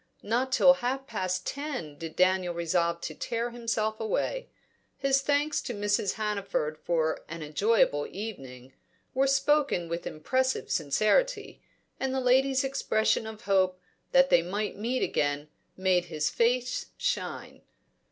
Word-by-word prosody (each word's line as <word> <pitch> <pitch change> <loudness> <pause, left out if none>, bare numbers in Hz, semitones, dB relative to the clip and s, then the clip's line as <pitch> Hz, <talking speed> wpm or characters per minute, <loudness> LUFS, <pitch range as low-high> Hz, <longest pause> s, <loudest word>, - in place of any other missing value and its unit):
Not 245 +5 0
till 270 +1 +7
half 265 +2 -1
past 185 -6 -2
ten 270 - -4
did 160 +1 -8
Daniel 185 -1 +2
resolve 170 0 0
to 155 - -4
tear 235 +8 -3
himself 225 -2 -2
away. - - -2 0.5
His 275 0 +2
thanks 290 +2 +1
to 245 - -5
Mrs. 205 -1 0
Hannaford 200 -8 -2
for 160 -2 0
an 165 0 -6
"enjoyable 150 -1 +2
evening" 135 - -8 0.4
were 270 +1 +2
spoken 275 - +2
with 170 +1 -3
impressive 260 +12 -1
sincerity, 215 - +1 0.4
and 265 0 -1
the - - +1
lady's 260 +1 +3
expression 225 -5 +1
of 220 -1 -8
hope 190 -4 +2 0.3
that 270 0 +5
they 170 - +6
might 205 +5 -3
meet 235 +5 -1
again 145 +1 -1 0.3
made 185 -1 +2
his 155 -3 -1
face 250 +2 +1
shine. - - -3
215 Hz, 135 wpm, -28 LUFS, 170-260 Hz, 0.5 s, till